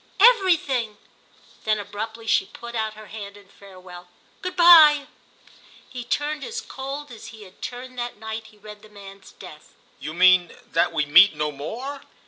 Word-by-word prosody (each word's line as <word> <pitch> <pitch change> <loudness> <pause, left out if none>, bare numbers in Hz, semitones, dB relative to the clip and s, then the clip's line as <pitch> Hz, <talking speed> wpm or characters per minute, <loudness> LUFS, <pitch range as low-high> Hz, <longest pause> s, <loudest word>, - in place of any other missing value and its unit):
"Everything!" 330 - +3 0.7
Then 215 0 +1
abruptly 220 +3 -7
she 195 -3 +1
put 235 0 -11
out 220 -2 -3
her 215 0 -12
hand 205 -1 -10
in 200 -1 -19
farewell. 185 -2 -14 0.3
"Good 365 0 -5
bye." 315 -5 +7 0.8
He 250 -2 -8
turned 290 +4 -3
as 460 0 -5
cold 275 - -8
as 230 - -11
he 220 -2 -12
had 190 -1 -18
turned 250 0 -8
that 240 -2 -5
night 220 +1 -7
he 215 - -21
read 210 0 -13
the 215 - -17
man's 195 -2 -14
death. 155 -5 -14 0.2
"You 155 - -7
mean 185 -1 +4 0.2
that 170 +1 +1
we 150 - -1
meet 170 +4 +6
no 150 0 -2
more?" 245 - -7
220 Hz, 165 wpm, -23 LUFS, 195-265 Hz, 0.8 s, bye